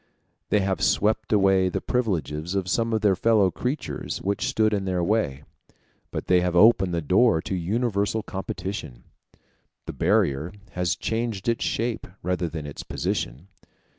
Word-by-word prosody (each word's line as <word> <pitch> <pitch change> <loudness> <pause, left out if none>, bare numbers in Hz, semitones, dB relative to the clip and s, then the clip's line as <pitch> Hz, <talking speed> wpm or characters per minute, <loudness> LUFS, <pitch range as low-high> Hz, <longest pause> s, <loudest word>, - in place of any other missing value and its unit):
They 105 - +3
have 95 -1 -1
swept 110 +1 +1
away 95 -3 +4
the - - -2
privileges 90 - -2
of 95 -2 -1
some 115 +5 0
of 110 -1 0
their 100 -3 +4
fellow 105 -2 +3
creatures 125 - -3
which 100 +1 -1
stood 110 -1 +2
in 100 -2 -1
their 90 -2 0
way, 85 -9 0 0.7
but - - -5
they 90 -1 +4
have 90 -1 -1
opened 95 -1 +5
the 85 -2 -1
door 95 - +4
to - - -4
universal 105 +3 0
competition: 95 -10 -6 0.8
the - - -6
barrier 70 +6 +1 0.2
has 90 -1 0
changed 115 -3 -3
its 115 0 +1
shape 115 0 -2 0.2
rather 90 0 -1
than 80 -2 -6
its 70 - -7
position. 65 +11 -3
95 Hz, 155 wpm, -25 LUFS, 85-110 Hz, 0.8 s, opened